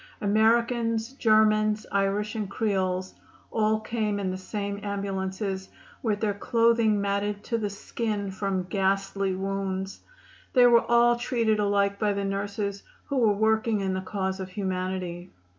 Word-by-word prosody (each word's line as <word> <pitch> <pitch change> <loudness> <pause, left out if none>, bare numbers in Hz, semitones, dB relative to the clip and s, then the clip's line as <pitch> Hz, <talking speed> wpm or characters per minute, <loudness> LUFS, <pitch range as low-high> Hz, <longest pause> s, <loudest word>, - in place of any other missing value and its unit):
Americans, 230 +2 +2
Germans, 215 -3 +3
Irish 200 +2 0
and 215 -4 -3
Creoles, 185 -4 -1 0.4
all 215 -1 +2
came 215 -2 -2
in 190 -2 -1
the - - -3
same 200 +1 -4
ambulances, 195 -1 -3 0.3
with 210 -3 -1
their 210 -2 +1
clothing 230 0 +2
matted 200 +1 -1
to 230 -1 -1
the 210 -2 -1
skin 205 0 -3
from 190 -1 -2
ghastly 195 0 0
wounds. 195 0 -3 0.5
They 250 -2 +6
were 235 -1 +6
all 240 0 +5
treated 230 -3 +1
alike 200 -1 +1
by 210 -2 +2
the 200 0 -2
nurses, 200 0 -3 0.3
who 280 - -1
were 225 -4 +4
working 220 +1 +2
in 190 -1 -1
the 185 - -2
cause 190 0 -3
of 190 -1 -5
humanity. 185 -2 -3
205 Hz, 140 wpm, -27 LUFS, 195-220 Hz, 0.5 s, They